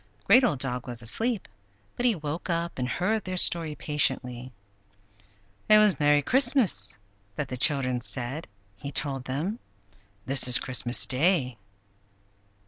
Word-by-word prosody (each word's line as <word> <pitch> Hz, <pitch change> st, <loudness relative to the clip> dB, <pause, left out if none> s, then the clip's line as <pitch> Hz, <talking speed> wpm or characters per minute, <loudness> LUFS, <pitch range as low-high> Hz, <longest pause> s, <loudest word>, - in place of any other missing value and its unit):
Great 260 Hz, -, +5 dB
Old 225 Hz, -, +1 dB
Dog 125 Hz, -1 st, -3 dB
was 120 Hz, -1 st, -5 dB
asleep, 220 Hz, -, -2 dB, 0.5 s
but 245 Hz, -, 0 dB
he 230 Hz, -, +2 dB
woke 155 Hz, +2 st, -6 dB
up 170 Hz, -3 st, -2 dB
and 125 Hz, 0 st, -2 dB
heard 210 Hz, +7 st, -1 dB
their 185 Hz, 0 st, -5 dB
story 165 Hz, -3 st, +3 dB
patiently. 130 Hz, -4 st, -2 dB, 1.2 s
"It 215 Hz, -, +8 dB
was 210 Hz, -4 st, +4 dB
'Merry 145 Hz, -1 st, +3 dB
Christmas!' 230 Hz, -, +2 dB, 0.4 s
that 140 Hz, 0 st, -4 dB
the 125 Hz, -, -4 dB
children 130 Hz, -2 st, +2 dB
said," 130 Hz, +5 st, -5 dB, 0.3 s
he 140 Hz, +6 st, -7 dB
told 135 Hz, -3 st, 0 dB
them. 165 Hz, -, -3 dB, 0.7 s
"This 135 Hz, +1 st, +2 dB
is 125 Hz, -1 st, +3 dB
Christmas 125 Hz, -1 st, 0 dB
Day." 135 Hz, -, 0 dB
145 Hz, 135 wpm, -26 LUFS, 125-185 Hz, 1.2 s, It